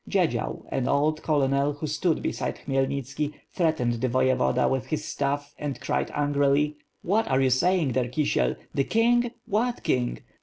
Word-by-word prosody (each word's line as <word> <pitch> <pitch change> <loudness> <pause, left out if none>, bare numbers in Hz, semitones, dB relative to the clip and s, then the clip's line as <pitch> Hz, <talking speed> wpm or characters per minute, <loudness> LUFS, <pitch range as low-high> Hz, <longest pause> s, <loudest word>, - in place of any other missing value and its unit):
Dziedzial, - - 0
an 130 - -1
old 155 +2 +1
colonel, 140 -1 +1
who 145 +2 -5
stood 155 +2 0
beside - - -2
Khmy 135 -1 +1
elnitski, 140 +2 -3 0.2
threatend 155 -9 +1
the 130 - +1
voyevoda 130 0 +2
with 130 -1 -1
his 155 - -2
staff 145 +1 -2
and 145 -2 -4
cried - - -1
angrily: 145 0 +2 0.3
"What 215 +5 +1
are 130 -1 +2
you 130 -1 +3
saying 165 +2 +2
there, 125 0 0
Kisiel? 145 +4 +1 0.2
The 140 - +1
king? 240 +2 +3 0.2
What 235 +4 -1
king? 125 -1 0
145 Hz, 160 wpm, -26 LUFS, 130-155 Hz, 0.3 s, you